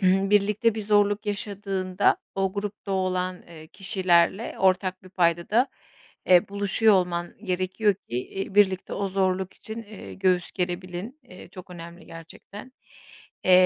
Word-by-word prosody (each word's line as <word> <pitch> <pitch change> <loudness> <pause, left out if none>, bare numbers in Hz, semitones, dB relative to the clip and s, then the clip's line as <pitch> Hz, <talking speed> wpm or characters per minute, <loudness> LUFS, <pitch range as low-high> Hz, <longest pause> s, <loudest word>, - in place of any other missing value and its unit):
birlikte 200 +4 +3
bir 215 - -3
zorluk 205 0 +2
yaşadığında 200 -2 0 0.2
o 195 -1 0
grupta 205 -1 -4
olan, 185 -1 -1
eee, 160 -2 -13
kişilerle 185 +2 +1
ortak 185 0 +1
bir 185 - -14
payda 170 -2 +1
da, 245 +5 +3 0.6
eee, 180 0 +5
buluşuyor 200 +2 +3
olman 175 -2 0
gerekiyor 185 +3 +1
ki, 120 -10 -8
eee, 195 0 -5
birlikte 190 -2 +3
o 200 -1 -2
zorluk 190 -1 0
için, 220 +1 -8
eee, 210 -2 -10
göğüs 185 -2 +1
gerebilin. 180 - -4
Eee, 185 -8 -13
çok 185 0 -12
önemli 170 0 -10
gerçekten. 195 +8 -11 0.7
Eee, 185 - +4
190 Hz, 135 wpm, -25 LUFS, 180-205 Hz, 0.7 s, eee